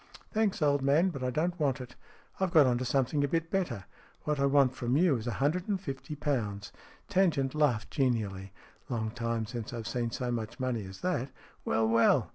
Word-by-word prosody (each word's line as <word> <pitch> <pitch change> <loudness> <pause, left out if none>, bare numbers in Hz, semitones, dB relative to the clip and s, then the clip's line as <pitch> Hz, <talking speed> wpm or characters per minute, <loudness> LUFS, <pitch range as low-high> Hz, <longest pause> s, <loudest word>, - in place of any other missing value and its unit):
"Thanks, 215 -6 +1
old 145 -1 +3
man, 145 +7 +4
but 135 -5 -6
I 125 - +1
don't 170 +7 -1
want 140 -3 +1
it. 125 -1 -9 0.4
I've 190 -1 +1
got 155 -5 +7
on 125 -1 +2
to 130 - -2
something 135 +3 +1
a - - +2
bit 165 +2 -1
better. 180 - -1 0.4
What 150 -1 -1
I 140 - +3
want 135 -2 +4
from 125 +1 0
you 170 -3 +4
is 115 +1 -6
a 120 - -1
hundred 160 +6 0
and 200 -3 0
fifty 150 -2 -6
pounds." 105 -9 -2 0.4
Tangent 165 -9 +2
laughed 145 -8 +1
genially. 105 - -1 0.2
" - - -32
Long 110 -3 -2
time 115 -1 -2
since 115 +1 -6
I've 115 -2 -5
seen 120 -2 -1
so 125 +1 -3
much 115 +1 -4
money 125 -5 -1
as 95 0 -11
that. 175 -8 -1 0.4
Well, 110 0 +2
well 115 +1 +4
135 Hz, 210 wpm, -30 LUFS, 115-155 Hz, 0.4 s, got